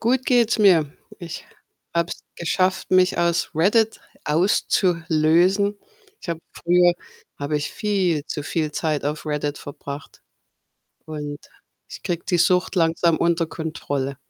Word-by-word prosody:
Gut 255 +3 +1
geht's 235 -3 +3
mir. 170 -8 +4 0.3
Ich 170 -2 -8 0.5
habe 170 0 +1
es - - -6 0.2
geschafft, 185 +2 0
mich 185 -1 +4
aus 170 -1 +1
Reddit 215 +7 +2 0.3
auszulösen. 175 +3 +2 0.4
Ich - - -12
habe 165 -1 -3
früher 175 0 +3 0.5
habe 145 +1 -1
ich 145 - -3
viel 190 -7 0
zu 150 - -4
viel 155 0 -2
Zeit 155 -2 -1
auf 150 +1 -3
Reddit 150 -1 -2
verbracht 140 0 -9 0.8
und 150 -2 -5 0.5
ich - - -10
kriege 170 -1 -3
die 175 - 0
Sucht 180 +3 +2
langsam 165 -1 +2
unter 170 0 +1
Kontrolle. 145 -4 -4
170 Hz, 130 wpm, -22 LUFS, 155-185 Hz, 0.8 s, mir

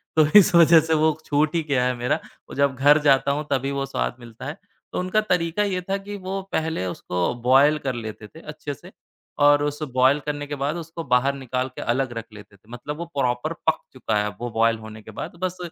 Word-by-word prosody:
तो 155 - +6
इस 180 - +3
वजह 170 -1 +8
से 160 +1 0
वो 155 -1 +2
छूट 150 +2 +1
ही 165 - +1
गया 125 -2 +2
है 125 - +1
मेरा 120 +1 0 0.3
और - - -8
जब 140 -1 +2
घर 145 +4 +5
जाता 140 -1 +4
हूँ, 150 +2 -2
तभी 135 +1 0
वो 140 0 -2
स्वाद 135 - -2
मिलता 115 -1 -11
है। 145 +4 -5 0.4
तो - - -1
उनका 185 +4 +1
तरीका 180 -1 0
ये 190 -3 -1
था 195 - +1
कि 200 +1 -8
वो 195 0 -4
पहले 160 - -1
उसको 90 +2 -2
बॉयल 135 +4 +5
कर 130 - 0
लेते 110 -2 -7
थे, 160 - -15
अच्छे 150 -2 -7
से 135 - -14 0.5
और 145 0 +5
उस 145 +1 -3
बॉयल 130 +3 +4
करने 145 0 -3
के 145 - -4
बाद 140 +3 -2
उसको 165 0 -7
बाहर 125 +1 +2
निकाल 130 -1 -3
के - - -6
अलग 130 +2 0
रख 115 - -5
लेते 105 -1 -13
थे, 105 +3 -26
मतलब 145 +5 -6
वो 170 - -5
प्रॉपर 125 +4 0
पक 160 - +3
चुका 115 -4 -1
है 105 - +1
अब 105 - -5
वो 120 - -3
बॉयल 115 +1 +2
होने 110 0 -10
के 110 - -12
बाद, 110 - -7
बस 185 0 -2
140 Hz, 235 wpm, -23 LUFS, 125-160 Hz, 0.5 s, वजह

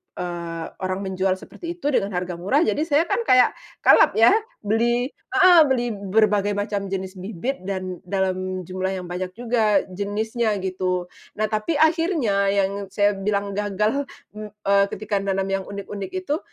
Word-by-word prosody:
eee, 170 -2 -5 0.2
orang 185 0 -2
menjual 190 0 0
seperti 340 - -8
itu 350 - -14
dengan 200 -5 +1
harga 180 0 -2
murah, 260 - +2
jadi - - 0
saya 300 0 +3
kan 345 - 0
kayak 255 -1 +6 0.3
kalap - - +6
ya, 225 +1 +7 0.3
beli 240 +5 +1 0.2
heeh, 370 -2 +7
beli 245 -3 0
berbagai 205 0 +1
macam 205 -1 -2
jenis 190 0 -5
bibit 205 +7 -4
dan 185 -2 -4
dalam 185 -1 -1
jumlah 185 +2 -3
yang 185 - -5
banyak 185 +1 -4
juga 225 -3 +2
jenisnya 215 +3 -1
gitu. 185 -1 -2 0.2
Nah, 215 +1 -1
tapi 215 +9 -1
akhirnya 310 - +2
yang 200 0 0
saya 205 +1 +2
bilang 200 0 -2
gagal, 210 +7 -1 0.2
m 215 0 -8 0.2
eee, 200 0 +4
ketika 205 0 -2
nanam 195 -1 -1
yang 195 0 -1
unik-unik 200 0 -6
itu, 350 -5 -1
200 Hz, 155 wpm, -23 LUFS, 190-225 Hz, 0.3 s, ya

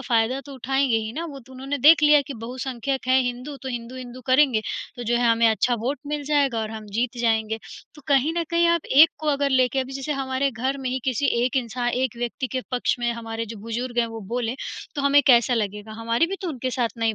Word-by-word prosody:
फ़ायदा 245 +1 +1
तो 280 - -9
उठाएँगे 265 -1 +1
ही 220 0 -3
ना, 330 +5 -4
वो 280 -4 -8
तो 260 +2 -17
उन्होंने 270 +2 -4
देख 300 +3 +7
लिया 295 -1 +7
कि 280 - -6
बहुसंख्यक 255 +3 -4
हैं 260 +1 +5
हिन्दू 250 +3 -4
तो 265 - -5
हिंदू, 240 +1 -6
हिंदू 255 0 -8
करेंगे। 255 -4 +4 0.4
तो 245 - -6
जो 240 +2 +1
है 240 -1 +2
हमें 230 0 +4
अच्छा 240 +2 +2
वोट 265 +5 -2
मिल 295 0 -3
जाएगा 280 -5 +1
और 215 0 -4
हम 220 -1 -8
जीत 240 +3 -1
जाएँगे। 220 -1 +1 0.4
तो 295 - -15
कहीं 280 +3 +3
न - - +1
कहीं 340 0 +3
आप 340 -1 +2
एक 320 +3 +9
को 310 - -3
अगर 280 -1 +1
लेके 260 0 +2
अभी 260 +1 -5
जैसे 275 +2 -3
हमारे 270 0 -1
घर 265 +3 -2
में 260 - -2
ही 260 - -1
किसी 265 +2 0 0.2
1 255 +1 -1
इंसान 245 0 -1
1 250 -1 -1
व्यक्ति 240 +2 -3
के 260 - -1
पक्ष 250 0 0
में 240 0 0
हमारे 225 -1 -5
जो 225 +1 -8
बुज़ुर्ग 240 +2 -4
हैं 235 - +3
वो 225 -1 -7
बोले, 240 0 -1 0.4
तो 285 - -2
हमें 280 +1 +5
कैसा 245 -1 +5
लगेगा? 210 0 -3
हमारी 230 +8 +1
भी 390 - -4
तो 360 - -2
उनके 260 -3 -3
साथ 245 -2 0
नहीं 225 -1 +1
255 Hz, 240 wpm, -24 LUFS, 235-275 Hz, 0.4 s, एक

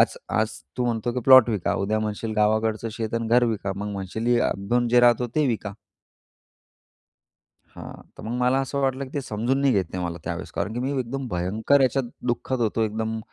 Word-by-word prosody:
आज - - +3 0.2
आज - - 0 0.3
तू 125 - 0
म्हणतो, 115 0 -1
की 125 - -2
प्लॉट 130 -3 +8
विका, 105 -6 -1
उद्या 105 +3 0
म्हणशील 110 +1 -3
गावाकडचं 110 +1 +1
शेत 110 0 -4
आणि 115 0 -1
घर 120 +1 +4
विका. 105 -4 -2
मग 105 +1 -4
म्हणशील 100 +3 -5
ही 120 0 +3
आपण 120 +5 0
जिथं 120 +1 +5
राहतो 120 0 +4
ते 155 -1 +3
विका. 110 -5 -2 1.9
हां. - - -11 0.2
तर - - -9
मग 110 - -5
मला 125 +2 +3
असं 135 +1 -3
वाटलं, 135 0 0
की 130 - -12
ते 145 - 0
समजून 120 +3 -1
नाही 140 -1 +3
घेत 95 -4 +2
नाही 90 -1 -3
मला. 85 0 -4
त्यावेळेस 85 +2 -5
कारण, 105 - -3
की 120 - -2
मी 135 +2 -1
एकदम 130 +2 -4
भयंकर 105 +10 +1
याच्यात 135 0 +2 0.2
दुःखत 125 +1 -1
होतो 115 0 0
एकदम 110 +1 -3
115 Hz, 205 wpm, -24 LUFS, 105-125 Hz, 1.9 s, प्लॉट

